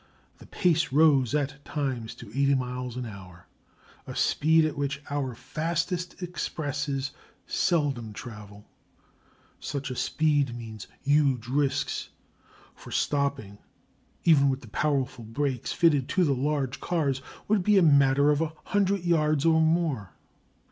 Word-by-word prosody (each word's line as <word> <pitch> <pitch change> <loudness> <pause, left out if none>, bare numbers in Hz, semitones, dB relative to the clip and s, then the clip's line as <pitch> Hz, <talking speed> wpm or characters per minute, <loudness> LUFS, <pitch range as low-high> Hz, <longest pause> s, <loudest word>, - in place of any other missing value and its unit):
The - - -14
pace 170 -5 +1
rose 140 -3 +4
at 145 -1 -2
times 130 -6 -3
to 115 - -11
eighty 140 +3 +2
miles 125 -1 -3
an 125 - -3
hour, 95 -5 -11 0.6
a - - -7
speed 160 +1 +3
at 155 - -2
which 145 0 -2
our 135 -4 -2
fastest 170 - -3
expresses 145 -5 -3 0.3
seldom 140 - 0
travel. 105 -1 -10 0.9
Such 140 -2 -4
a - - -4
speed 145 -3 +1
means 110 -3 -8 0.2
huge 140 -5 +2
risks, 140 +1 -1 0.6
for - - -13
stopping, 140 -8 -1 0.6
even 145 -5 +5
with 135 0 -2
the 115 - -13
powerful 130 -1 -1
brakes 125 +2 -2
fitted 150 -7 +2
to 185 - +2
the 145 -5 +2
large 135 -1 -1
cars, 140 -6 -1 0.3
would 210 -1 +3
be 205 +2 +4
a 190 - +6
matter 140 -1 +5
of 150 +1 +1
a 160 -1 -2
hundred 200 -2 +1
yards 155 -3 +2
or 160 -1 +5
more. 160 - 0
140 Hz, 135 wpm, -27 LUFS, 125-155 Hz, 0.9 s, a